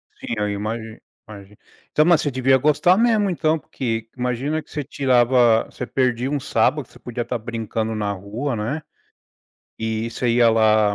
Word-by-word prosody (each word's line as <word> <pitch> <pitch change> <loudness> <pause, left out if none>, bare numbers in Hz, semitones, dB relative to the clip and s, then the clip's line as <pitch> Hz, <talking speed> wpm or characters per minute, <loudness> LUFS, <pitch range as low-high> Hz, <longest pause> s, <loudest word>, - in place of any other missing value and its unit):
Sim, - - -6
eu 105 0 0
imagi 110 +2 -4 0.3
imagi 100 -1 -12 0.3
então, 155 - +3
mas 170 -2 +5
você 145 - -1
devia 130 +1 +3
gostar 155 +7 +3
mesmo 220 -3 +3
então, 160 -2 +1
porque 115 -5 -4
imagina 130 +6 -2
que - - -28
você 150 - -3
tirava 125 -4 +3
você 125 - -7
perdia 125 +1 0
um 145 - 0
sábado, 145 +1 +1
que - - -26
você - - -16
podia 120 0 -5
estar 120 +1 -2
brincando 110 -1 -3
na 105 -1 -1
rua, 110 +8 -4
né, 125 +9 -3 1.0
e 110 0 -2
você 125 - -2
ia 120 0 +4
lá, 110 -2 +3
120 Hz, 175 wpm, -21 LUFS, 110-145 Hz, 1.0 s, mas